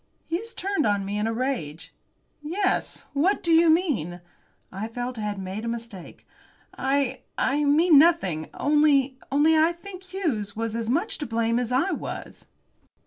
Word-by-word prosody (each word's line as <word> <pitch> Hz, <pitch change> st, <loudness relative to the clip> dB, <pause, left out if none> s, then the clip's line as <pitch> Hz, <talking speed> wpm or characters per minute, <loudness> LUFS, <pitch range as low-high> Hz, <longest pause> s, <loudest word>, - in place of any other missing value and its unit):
Hughes 420 Hz, +8 st, -4 dB
turned 380 Hz, -, 0 dB
on 200 Hz, -1 st, 0 dB
me 205 Hz, +1 st, -2 dB
in 215 Hz, -, 0 dB
a -, -, 0 dB
rage. 225 Hz, -, -3 dB, 0.5 s
"Yes. 370 Hz, +6 st, -1 dB
What 340 Hz, +9 st, +1 dB
do 335 Hz, -, +2 dB
you 330 Hz, 0 st, +6 dB
mean?" 280 Hz, -, +1 dB, 0.5 s
I 195 Hz, +4 st, -4 dB
felt 245 Hz, +1 st, -5 dB
I -, -, -3 dB
had 210 Hz, -1 st, -3 dB
made 190 Hz, +3 st, -5 dB
a -, -, -4 dB
mistake. 230 Hz, -6 st, -7 dB, 0.5 s
"I 275 Hz, 0 st, 0 dB, 0.2 s
I 290 Hz, +2 st, +1 dB
mean 305 Hz, +1 st, +6 dB
nothing. 195 Hz, -, +2 dB
Only 285 Hz, -3 st, +3 dB
only 300 Hz, +3 st, +4 dB
I 320 Hz, +2 st, +4 dB
think 365 Hz, +2 st, -10 dB
Hughes 300 Hz, -, -3 dB
was 225 Hz, 0 st, -3 dB
as 230 Hz, -1 st, -3 dB
much 335 Hz, -, -1 dB
to 295 Hz, -, -4 dB
blame 230 Hz, +1 st, +1 dB
as 245 Hz, -1 st, -3 dB
I 275 Hz, +10 st, +2 dB
was." -, -, -6 dB
270 Hz, 165 wpm, -25 LUFS, 220-325 Hz, 0.5 s, you